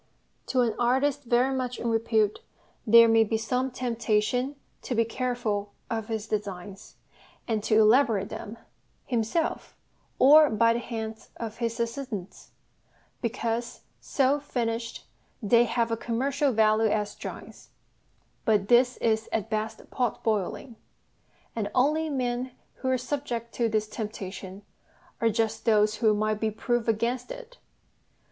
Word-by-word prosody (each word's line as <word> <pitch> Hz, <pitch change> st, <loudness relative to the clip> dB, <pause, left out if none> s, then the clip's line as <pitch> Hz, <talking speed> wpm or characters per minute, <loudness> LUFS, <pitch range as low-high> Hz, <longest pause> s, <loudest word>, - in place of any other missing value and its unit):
To 255 Hz, -, +2 dB
an 235 Hz, -3 st, +1 dB
artist 265 Hz, +3 st, +1 dB
very 245 Hz, +3 st, +2 dB
much 250 Hz, -2 st, -2 dB
in -, -, -3 dB
repute 220 Hz, -2 st, +1 dB, 0.5 s
there 230 Hz, +1 st, +8 dB
may 225 Hz, 0 st, +5 dB
be 220 Hz, +1 st, -1 dB
some 250 Hz, +4 st, -1 dB
temptation 245 Hz, +1 st, -1 dB, 0.3 s
to 250 Hz, -, -3 dB
be 230 Hz, 0 st, +3 dB
careful 230 Hz, -4 st, -2 dB, 0.2 s
of 225 Hz, -2 st, -2 dB
his 220 Hz, -2 st, -3 dB
designs, 200 Hz, -2 st, -5 dB, 0.5 s
and 220 Hz, -3 st, 0 dB
to 215 Hz, -, +4 dB
elaborate 220 Hz, -3 st, +4 dB
them 215 Hz, +2 st, -7 dB, 0.5 s
(himself, 240 Hz, +7 st, -2 dB, 0.4 s
or 300 Hz, +3 st, +7 dB
by 230 Hz, +1 st, +3 dB
the 235 Hz, -, -1 dB
hands 220 Hz, -2 st, -6 dB
of 225 Hz, -2 st, -6 dB
his 230 Hz, 0 st, -2 dB
assistants), 235 Hz, -5 st, -5 dB, 0.7 s
because, 235 Hz, 0 st, -3 dB, 0.2 s
so 275 Hz, +1 st, +1 dB
finished, 230 Hz, -4 st, -3 dB, 0.3 s
they 235 Hz, +2 st, +4 dB
have 235 Hz, -1 st, 0 dB
a 230 Hz, -, 0 dB
commercial 275 Hz, +5 st, 0 dB
value 220 Hz, -1 st, +3 dB
as 210 Hz, -1 st, -1 dB
drawings -, -, -9 dB, 0.7 s
but 210 Hz, -3 st, +1 dB
this 250 Hz, +1 st, +4 dB
is 220 Hz, -1 st, 0 dB
at 220 Hz, 0 st, -2 dB
best 220 Hz, +1 st, -3 dB
pot 245 Hz, -4 st, -1 dB
boiling; 220 Hz, +3 st, -2 dB, 0.8 s
and 220 Hz, -3 st, -1 dB
the -, -, -9 dB
only 305 Hz, +5 st, +2 dB
men 250 Hz, -2 st, -2 dB, 0.2 s
who 260 Hz, -, -5 dB
are 260 Hz, -, +2 dB
subject 245 Hz, -3 st, -4 dB
to 235 Hz, -2 st, 0 dB
this 215 Hz, -1 st, 0 dB
temptation 200 Hz, -3 st, -7 dB, 0.6 s
are 230 Hz, -, +4 dB
just 225 Hz, 0 st, -1 dB
those 215 Hz, -1 st, +3 dB
who 215 Hz, -2 st, +3 dB
might 215 Hz, 0 st, 0 dB
be 220 Hz, -, 0 dB
proof 240 Hz, +2 st, -1 dB
against 235 Hz, -, 0 dB
it. -, -, -10 dB
230 Hz, 140 wpm, -27 LUFS, 215-250 Hz, 0.8 s, there